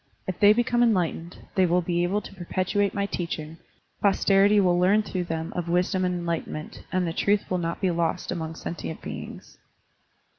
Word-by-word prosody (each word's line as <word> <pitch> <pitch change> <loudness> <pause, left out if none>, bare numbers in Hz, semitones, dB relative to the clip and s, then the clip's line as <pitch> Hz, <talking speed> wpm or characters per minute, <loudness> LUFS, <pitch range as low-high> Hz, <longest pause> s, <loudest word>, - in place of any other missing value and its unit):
If 185 - -4
they 205 0 +7
become 240 +2 +2
enlight 195 -8 +3
ened, 170 +2 -9 0.2
they 185 -1 +3
will 175 +1 +2
be 175 0 0
able 190 +4 0
to - - -11
perpetuate 190 +2 -1
my 200 -1 0
teaching, 165 -4 -4 0.4
posterity 200 +1 +4
will 180 -2 +3
learn 200 +4 +4
through 185 -3 -3
them 165 -1 -4
of 175 -1 -3
wisdom 180 +2 +1
and 180 0 0
enlightenment, 170 -3 -4
and 185 -1 +1
the 165 - -2
truth 200 +3 +1
will 180 - +1
not 170 0 -3
be 185 - +1
lost 170 +1 -1
among 160 -2 -4
sentient 160 -1 -6
beings." - - -8
180 Hz, 185 wpm, -26 LUFS, 170-200 Hz, 0.4 s, they